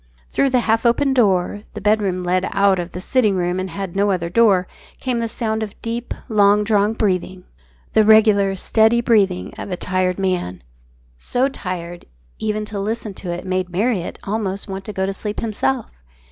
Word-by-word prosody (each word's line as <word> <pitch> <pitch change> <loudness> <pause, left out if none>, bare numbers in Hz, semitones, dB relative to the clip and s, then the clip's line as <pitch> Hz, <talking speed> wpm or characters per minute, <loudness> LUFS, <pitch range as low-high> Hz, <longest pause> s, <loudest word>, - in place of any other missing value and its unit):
Through 275 - +2
the 255 -1 +2
half 225 0 +1
open 265 +3 +2
door 205 -5 +2
the - - -4
bedroom 200 -3 +1
led 185 +1 0
out 195 -1 +3
of 175 0 -4
the 180 - -6
sitting 215 +1 +1
room 180 0 -1
and 185 0 -3
had 195 0 -6
no 200 +1 +2
other 170 -3 -1
door 195 -3 +4 0.3
came 250 -2 -1
the 230 - -1
sound 220 -1 -2
of 210 -2 -6
deep, 235 +1 -4
long 210 -2 +4
drawn 210 0 +2
breathing, 185 -4 -1 0.5
the 220 - +5
regular, 210 -2 +5
steady 220 +4 +3
breathing 205 -6 +1
of - - -6
a 180 - -3
tired 185 0 0
man, 180 - -2 0.6
so 250 - 0
tired 175 -7 -6
that, - - -23 0.3
even 215 0 -2
to 210 -1 -5
listen 215 +1 -3
to 185 -2 -6
it 175 +1 -5
made 185 -1 -1
Marriott 195 0 -1
almost 200 -1 -3
want 195 0 -6
to - - -5
go 190 0 -1
to 195 - -2
sleep 210 +2 -4
himself. 135 - -1
200 Hz, 190 wpm, -20 LUFS, 185-220 Hz, 0.6 s, the